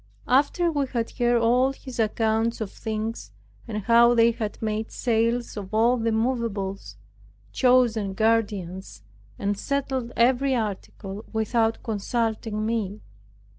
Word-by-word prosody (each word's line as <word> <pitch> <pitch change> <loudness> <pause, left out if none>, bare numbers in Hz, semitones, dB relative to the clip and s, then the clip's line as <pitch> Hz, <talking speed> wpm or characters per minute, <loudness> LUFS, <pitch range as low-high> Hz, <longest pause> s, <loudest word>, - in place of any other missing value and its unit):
After 290 +7 +2
we 285 -3 0
had 235 -3 -2
heard 240 -1 +2
all 250 +4 +3
his 260 -2 -10
accounts 225 +1 +1
of 215 -3 -4
things 220 +1 -4 0.4
and 210 -3 -4
how 235 +2 +5
they 230 0 +5
had 220 -3 -5
made 220 0 -2
sales 235 +1 0
of 200 -3 -7
all 235 +3 +4
the 230 -1 0
moveables, 215 - -2 0.6
chosen 235 - +2
guardians, 200 - -1 0.3
and 200 +1 -1
settled 265 0 -2
every 260 +3 +3
article, 205 -2 -5
without 225 0 0
consulting 220 0 -2
me. 215 -2 -2
225 Hz, 125 wpm, -25 LUFS, 215-240 Hz, 0.6 s, how